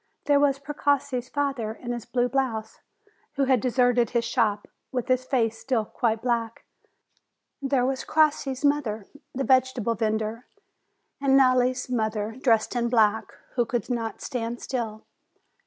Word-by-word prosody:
There 285 Hz, -1 st, +4 dB
was 280 Hz, -1 st, +3 dB
Precossi's 280 Hz, -3 st, -1 dB
father, 275 Hz, -7 st, -2 dB
in 240 Hz, +2 st, -7 dB
his 240 Hz, -2 st, -5 dB
blue 245 Hz, 0 st, +1 dB
blouse, 240 Hz, -5 st, -2 dB, 0.5 s
who 280 Hz, -, 0 dB
had 260 Hz, -2 st, +3 dB
deserted 245 Hz, -2 st, +2 dB
his 235 Hz, -1 st, 0 dB
shop, 205 Hz, -3 st, 0 dB, 0.2 s
with 250 Hz, -3 st, -2 dB
his 255 Hz, 0 st, +2 dB
face 230 Hz, -4 st, 0 dB
still 225 Hz, -1 st, 0 dB
quite 225 Hz, 0 st, -1 dB
black. 230 Hz, -2 st, -1 dB, 1.0 s
There 270 Hz, -2 st, +1 dB
was 265 Hz, 0 st, -1 dB
Crossi's 295 Hz, -3 st, +1 dB
mother, 245 Hz, -8 st, 0 dB, 0.3 s
the 270 Hz, -, -1 dB
vegetable 255 Hz, -3 st, +2 dB
vendor; 220 Hz, +1 st, -2 dB, 0.7 s
and 270 Hz, -1 st, +4 dB
Nelli's 255 Hz, -1 st, +3 dB
mother, 220 Hz, -3 st, -2 dB
dressed 230 Hz, -2 st, +2 dB
in 235 Hz, -1 st, 0 dB
black, 220 Hz, -2 st, +2 dB, 0.2 s
who 245 Hz, -, +2 dB
could 240 Hz, +1 st, -3 dB
not 230 Hz, -2 st, -3 dB
stand 235 Hz, -1 st, -4 dB
still. 225 Hz, -4 st, -4 dB
245 Hz, 140 wpm, -26 LUFS, 225-265 Hz, 1.0 s, There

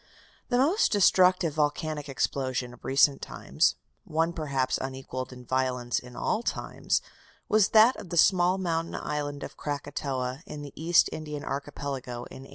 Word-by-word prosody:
The 245 Hz, -, +2 dB
most 315 Hz, -, +3 dB
destructive 185 Hz, -4 st, +4 dB
volcanic 150 Hz, 0 st, -1 dB
explosion 130 Hz, -2 st, -1 dB
of 125 Hz, -, -17 dB
recent 135 Hz, +1 st, +3 dB
times, -, -, 0 dB, 0.3 s
one 165 Hz, +2 st, 0 dB
perhaps 140 Hz, -5 st, -1 dB
unequalled 130 Hz, -1 st, -5 dB
in 125 Hz, -1 st, -11 dB
violence 125 Hz, -1 st, 0 dB
in 125 Hz, 0 st, -13 dB
all 220 Hz, -, 0 dB
times, -, -, -1 dB, 0.4 s
was 215 Hz, -3 st, +4 dB
that 225 Hz, +4 st, +6 dB
of 180 Hz, -, -9 dB
the 175 Hz, -, -3 dB
small 180 Hz, +1 st, +4 dB
mountain 165 Hz, -3 st, -2 dB
island 145 Hz, -1 st, -3 dB
of -, -, -8 dB
Krakatoa, 140 Hz, -2 st, -3 dB
in 150 Hz, -5 st, -7 dB
the 145 Hz, -, -9 dB
East 165 Hz, +2 st, +4 dB
Indian 150 Hz, -2 st, -6 dB
Archipelago, 140 Hz, -2 st, -4 dB, 0.2 s
in 135 Hz, -, -10 dB
1883. -, -, -15 dB
145 Hz, 155 wpm, -28 LUFS, 130-170 Hz, 0.4 s, that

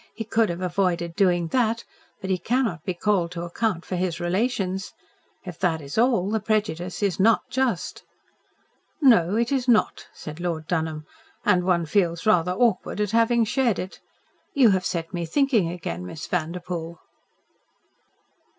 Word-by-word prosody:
"He 225 Hz, -, -4 dB
could 225 Hz, -1 st, +1 dB
have 170 Hz, +1 st, -4 dB
avoided 175 Hz, -2 st, 0 dB
doing 175 Hz, -4 st, +2 dB
that 230 Hz, 0 st, +1 dB, 0.4 s
but 190 Hz, -, -3 dB
he 185 Hz, -, +1 dB
cannot 225 Hz, -, 0 dB
be 185 Hz, -1 st, -3 dB
called 185 Hz, -2 st, +1 dB
to 170 Hz, -1 st, -5 dB
account 175 Hz, 0 st, -2 dB
for 185 Hz, -, -3 dB
his 180 Hz, -2 st, -2 dB
relations. 190 Hz, 0 st, -1 dB, 0.5 s
If 180 Hz, -4 st, -8 dB
that 170 Hz, -4 st, +1 dB
is 140 Hz, -2 st, -8 dB
all 220 Hz, -5 st, +2 dB
the 220 Hz, -, +1 dB
prejudice 205 Hz, -4 st, -2 dB
is 195 Hz, -3 st, 0 dB
NOT 225 Hz, +3 st, +4 dB
just." 260 Hz, -1 st, -1 dB, 1.0 s
"No, 210 Hz, -, +5 dB
it 235 Hz, +2 st, +1 dB
is 265 Hz, -2 st, 0 dB
not," 235 Hz, -3 st, +2 dB
said 155 Hz, +1 st, -9 dB
Lord 170 Hz, -3 st, -3 dB
Dunholm, 160 Hz, -2 st, -2 dB, 0.4 s
"and 180 Hz, -3 st, +3 dB
one 175 Hz, -2 st, +2 dB
feels 170 Hz, 0 st, 0 dB
rather 180 Hz, -5 st, +3 dB
awkward 220 Hz, -1 st, +1 dB
at 210 Hz, -1 st, 0 dB
having 230 Hz, 0 st, +3 dB
shared 240 Hz, -3 st, +1 dB
it. 185 Hz, -, -6 dB, 0.6 s
You 255 Hz, -6 st, +6 dB
have 185 Hz, -1 st, +1 dB
set 170 Hz, 0 st, -4 dB
me 175 Hz, -1 st, -2 dB
thinking 235 Hz, -, +2 dB
again, 150 Hz, -, -5 dB
Miss 150 Hz, -, -7 dB
Vanderpoel." 170 Hz, 0 st, -4 dB
185 Hz, 160 wpm, -24 LUFS, 170-225 Hz, 1.0 s, You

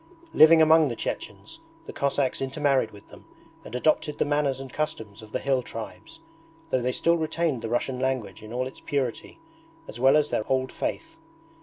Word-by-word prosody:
Living 160 Hz, +1 st, +8 dB
among 160 Hz, 0 st, +6 dB
the 120 Hz, -, -3 dB
Chechens -, -, -6 dB, 0.3 s
the -, -, -8 dB
Cossacks 140 Hz, -1 st, 0 dB
intermarried 135 Hz, -2 st, +1 dB
with 100 Hz, -1 st, -16 dB
them -, -, -14 dB, 0.4 s
and -, -, -9 dB
adopted 150 Hz, +3 st, +1 dB
the -, -, +1 dB
manners 145 Hz, -2 st, 0 dB
and 135 Hz, -1 st, -9 dB
customs 110 Hz, -9 st, -4 dB
of 110 Hz, 0 st, -13 dB
the -, -, -1 dB
hill 135 Hz, -2 st, 0 dB
tribes, 115 Hz, -2 st, -9 dB, 0.5 s
though 130 Hz, -, +2 dB
they 125 Hz, +1 st, 0 dB
still 170 Hz, +6 st, +2 dB
retained 160 Hz, -4 st, -1 dB
the 115 Hz, -, -4 dB
Russian 125 Hz, +2 st, -1 dB
language 130 Hz, -6 st, -2 dB
in 110 Hz, 0 st, -11 dB
all 125 Hz, +2 st, -1 dB
its 130 Hz, -, -9 dB
purity, 135 Hz, -5 st, -3 dB, 0.5 s
as -, -, -8 dB
well 135 Hz, +4 st, +5 dB
as 150 Hz, -1 st, +1 dB
their 110 Hz, -, -1 dB
Old 130 Hz, -1 st, +1 dB
Faith. 330 Hz, 0 st, -4 dB
135 Hz, 185 wpm, -26 LUFS, 120-150 Hz, 0.5 s, Living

